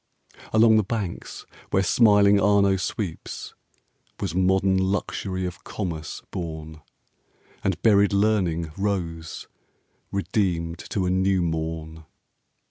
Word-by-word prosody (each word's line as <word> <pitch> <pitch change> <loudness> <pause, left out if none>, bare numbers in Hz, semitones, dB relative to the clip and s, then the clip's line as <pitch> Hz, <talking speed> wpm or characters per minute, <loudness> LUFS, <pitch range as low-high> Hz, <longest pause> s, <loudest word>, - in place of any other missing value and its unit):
Along 110 0 +6
the 110 - +3
banks 100 -4 -5 0.2
where 95 - +2
smiling 100 -1 +5
Arno 100 -1 +4
sweeps 95 -1 -4 0.7
Was 95 -5 -3
modern 95 +1 +2
Luxury 95 -1 -2
of 90 0 -6
Commerce 85 -6 -5
born, 80 -2 -6 0.8
And 95 -4 0
buried 100 -3 +5
Learning 95 -6 +1
rose, 85 -5 -3 0.6
redeemed 90 -4 -1
to 95 -3 -1
a 90 - +1
new 95 0 +2
morn. 80 -1 -4
95 Hz, 105 wpm, -24 LUFS, 85-100 Hz, 0.8 s, Along